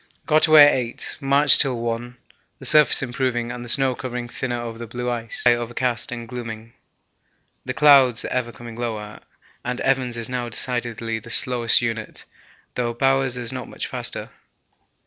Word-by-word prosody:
Got 155 +1 +4
away 155 -2 +9
at - - +3
8; 120 -3 -3
marched 140 0 +5
till 130 -4 0
1; 120 +1 -4 0.4
the - - -11
surface 150 -2 +5
improving 125 -2 -2
and 120 -1 -6
snow 135 +1 +4
covering 125 -1 -6
thinner 120 0 -4
over 115 -1 -7
the 120 - -7
blue 125 +2 -4
ice, 115 -1 -5
but 120 - +7
the - - +3
sky - - -4
overcast 120 -1 -2
and 120 -1 -6
glooming, 115 -2 -8 0.9
the - - -4
clouds 135 -5 +5
ever 125 -2 -2
coming 120 -1 -11
lower, 110 -3 -5 0.4
and 125 0 -4
Evans' 130 -3 0
is 115 -1 -3
now 125 -1 -4
decidedly 115 -1 -2
the 115 - -14
slowest 120 0 +2
unit, 115 -2 -5 0.5
though 120 -1 -3
Bowers' 135 0 +1
is 120 -2 -5
not 130 -2 -7
much - - -6
faster. - - -4
120 Hz, 170 wpm, -22 LUFS, 115-130 Hz, 0.9 s, away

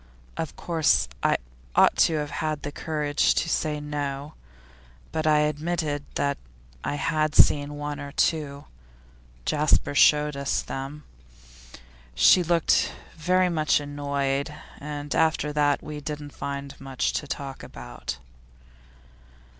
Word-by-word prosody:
Of 160 -2 -4
course 160 - +2
I - - +3 0.4
ought - - +6
to 160 - +4
have 150 -1 -2
had 155 -2 -2
the 145 - -4
courage 150 -1 +1
to - - +1
say 155 -2 0
no, 145 0 -4 0.8
but 155 0 -1
I 150 -1 +5
admitted 150 -1 -1
that 140 0 0 0.4
I - - -1
had 155 0 0
seen 145 0 +5
one 145 0 -4
or 140 0 -6
two 145 -2 0 0.8
Jasper 150 -1 +2
showed 150 0 +5
us 140 0 -1
them. 135 +3 -6 1.1
She 180 - +7
looked 170 -1 +2 0.2
very 180 +3 +2
much 155 -3 +2
annoyed, 140 -1 -2 0.3
and 145 0 -5
after 160 -2 +2
that 145 -1 +2
we 150 -1 -6
didn't 145 0 -6
find 140 0 -6
much 135 -1 -1
to 145 - -3
talk 135 -1 -5
about. - - -7
150 Hz, 125 wpm, -26 LUFS, 140-155 Hz, 1.1 s, She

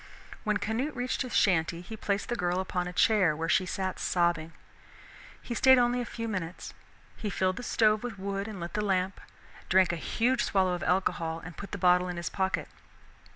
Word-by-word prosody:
When 210 -2 +1
Canute 245 +9 -2
reached 250 +1 -2
his 255 -3 -3
shanty 170 -3 +2
he 200 +5 -8
placed 205 -1 -2
the 240 - 0
girl 180 -3 0
upon 180 -1 -2
a - - -4
chair, 185 -4 +3
where 165 +2 -3
she 185 +2 +2
sat 190 0 -3
sobbing. 170 -2 +1 0.9
He 240 - -4
stayed 260 +2 +6
only 245 0 +2
a - - -3
few 230 -1 -5
minutes. 185 -5 -5 0.4
He 210 - -4
filled 185 -1 0
the - - -4
stove 215 -3 +2
with 240 -4 -5
wood 195 +1 -3
and 210 -4 -7
lit 170 0 -6
the 210 - 0
lamp, 190 -1 0 0.5
drank 185 -1 +5
a - - -2
huge 240 +9 +1
swallow 190 -3 +2
of 180 - -3
alcohol 165 -3 0
and 175 -2 -9
put 200 - -8
the - - -4
bottle 180 -1 +4
in 180 -1 -4
his 170 - -3
pocket. 190 0 -1
190 Hz, 200 wpm, -29 LUFS, 180-220 Hz, 0.9 s, stayed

